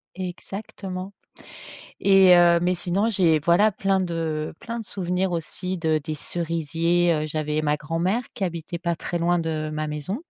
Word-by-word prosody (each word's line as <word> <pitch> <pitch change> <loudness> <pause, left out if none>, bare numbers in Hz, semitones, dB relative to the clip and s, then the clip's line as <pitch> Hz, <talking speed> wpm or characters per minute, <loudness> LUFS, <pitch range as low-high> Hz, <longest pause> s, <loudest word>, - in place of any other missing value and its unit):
Exactement 190 +1 -6 0.9
et 195 -2 +7
heu, 175 -1 +6
mais 180 +1 +1
sinon 185 +5 0
j'ai 175 -7 +3
voilà 175 +7 +4
plein 195 0 0
de 165 -4 -2
plein 230 0 -5
de - - -7
souvenirs 185 -1 -1
aussi 175 +2 -3
de 160 -1 +1
des 155 0 -4
cerisiers. 165 0 0
J'avais 155 0 -1
ma 150 0 +1
grand-mère 170 +9 -1
qui - - -7
habitait 170 -1 -3
pas 170 -1 -1
très 175 - -3
loin 175 +1 +2
de 155 -2 -2
ma 155 0 -2
maison, 150 +7 -3
170 Hz, 155 wpm, -24 LUFS, 160-185 Hz, 0.9 s, et